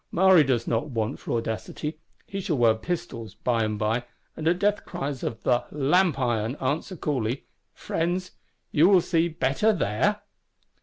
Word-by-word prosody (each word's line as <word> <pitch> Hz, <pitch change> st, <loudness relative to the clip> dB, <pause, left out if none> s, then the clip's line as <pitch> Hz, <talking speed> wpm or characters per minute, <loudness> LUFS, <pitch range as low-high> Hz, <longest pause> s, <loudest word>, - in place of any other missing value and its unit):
Maury 185 Hz, -2 st, +6 dB
does 125 Hz, -4 st, 0 dB
not 120 Hz, +6 st, 0 dB
want 115 Hz, 0 st, -2 dB
for -, -, -4 dB
audacity. 115 Hz, +7 st, -4 dB, 0.3 s
He 195 Hz, 0 st, -5 dB
shall 160 Hz, -5 st, -1 dB
wear 115 Hz, -2 st, +5 dB
pistols, 115 Hz, -, -5 dB
by 115 Hz, -2 st, 0 dB
and 110 Hz, -1 st, -1 dB
by; 110 Hz, +3 st, 0 dB, 0.3 s
and 160 Hz, -, -3 dB
at 175 Hz, +2 st, +3 dB
death 205 Hz, +2 st, +1 dB
cries 140 Hz, -2 st, -4 dB
of 115 Hz, -, -5 dB
'La 120 Hz, -1 st, +2 dB
Lanterne, -, -, -11 dB
The 140 Hz, -, -1 dB
Lamp 175 Hz, -1 st, +3 dB
iron;' 120 Hz, 0 st, 0 dB
answer 145 Hz, +8 st, -2 dB
coolly, 130 Hz, -6 st, -2 dB, 0.3 s
'Friends, 175 Hz, +2 st, -2 dB, 0.4 s
will 170 Hz, +6 st, +6 dB
you 180 Hz, -, +6 dB
see 165 Hz, 0 st, +1 dB
better 160 Hz, +6 st, +1 dB
there? 200 Hz, -, 0 dB
140 Hz, 170 wpm, -26 LUFS, 115-175 Hz, 0.4 s, Maury